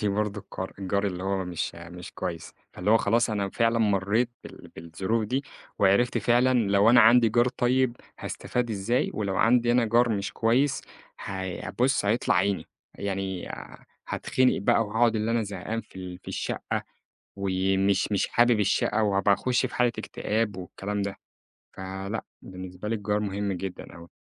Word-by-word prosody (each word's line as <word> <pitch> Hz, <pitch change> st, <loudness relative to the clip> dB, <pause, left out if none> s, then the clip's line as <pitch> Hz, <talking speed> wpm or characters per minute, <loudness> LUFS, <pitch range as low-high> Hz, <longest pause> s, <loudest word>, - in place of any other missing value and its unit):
عندي 105 Hz, -, +1 dB
برضه 105 Hz, 0 st, -1 dB
الكار 95 Hz, 0 st, -7 dB
الجار 100 Hz, +1 st, 0 dB
اللي 90 Hz, -1 st, -4 dB
هو 95 Hz, -1 st, -1 dB
مش 90 Hz, -2 st, -3 dB
مش 85 Hz, +1 st, -10 dB
كويس، 85 Hz, -3 st, -5 dB, 0.2 s
فاللي 95 Hz, +4 st, -1 dB
هو 115 Hz, -, +7 dB
خلاص 115 Hz, +2 st, +2 dB
أنا 100 Hz, -2 st, -1 dB
فعلًا 115 Hz, +1 st, +2 dB
مرّيت 105 Hz, +3 st, +2 dB
بال -, -, -12 dB
بالظروف 95 Hz, +7 st, -2 dB
دي، 130 Hz, +6 st, -2 dB, 0.3 s
وعرفت 100 Hz, +5 st, +3 dB
فعلًا 125 Hz, +2 st, +3 dB, 0.2 s
لو 100 Hz, +3 st, +5 dB
أنا 120 Hz, 0 st, +7 dB
عندي 115 Hz, +1 st, +6 dB
جار 120 Hz, +3 st, +3 dB
طيب، 125 Hz, -1 st, +1 dB, 0.2 s
هاستفاد 120 Hz, -2 st, -3 dB
إزاي، 110 Hz, +4 st, 0 dB
ولو 100 Hz, -3 st, -2 dB
عندي 120 Hz, +1 st, +4 dB
أنا 120 Hz, -1 st, +3 dB
جار 120 Hz, +2 st, +3 dB
مش 100 Hz, -3 st, -2 dB
كويس 125 Hz, +5 st, +1 dB, 0.4 s
هي 95 Hz, -2 st, -5 dB
بُصّ، 130 Hz, -4 st, +3 dB
هيطلع 110 Hz, +4 st, +2 dB
عيني 95 Hz, +2 st, +1 dB, 0.3 s
يعني 95 Hz, -2 st, -4 dB
آآ، -, -, -9 dB, 0.2 s
هاتخنق 130 Hz, 0 st, +1 dB
بقى 115 Hz, +3 st, +3 dB
وهاقعد 115 Hz, +2 st, +2 dB
اللي 110 Hz, +1 st, -1 dB
أنا 115 Hz, -1 st, +1 dB
زهقان 100 Hz, +3 st, -4 dB
في -, -, -18 dB
ال 90 Hz, -1 st, -7 dB
في -, -, -13 dB
الشقة، -, -, -3 dB, 0.5 s
و 100 Hz, -1 st, -2 dB, 0.3 s
مش 100 Hz, +1 st, +2 dB
مش 100 Hz, -, +1 dB
حابب 120 Hz, -2 st, +3 dB
الشقة 105 Hz, +2 st, +1 dB
وهابقى 100 Hz, -1 st, +3 dB
أخُشّ 125 Hz, +3 st, +1 dB
في 130 Hz, -, -6 dB
حالة 125 Hz, -1 st, +3 dB
اكتئاب 110 Hz, -1 st, -2 dB
والكلام 100 Hz, +3 st, -4 dB
ده، 100 Hz, 0 st, -3 dB, 0.6 s
فلأ 95 Hz, +3 st, -5 dB, 0.2 s
بالنسبة 95 Hz, +2 st, -8 dB
لي 115 Hz, -, 0 dB
الجار 105 Hz, 0 st, -1 dB
مهم 100 Hz, 0 st, -2 dB
جدًا 95 Hz, 0 st, -6 dB
أوي. 85 Hz, 0 st, -12 dB
105 Hz, 170 wpm, -27 LUFS, 95-115 Hz, 0.6 s, هو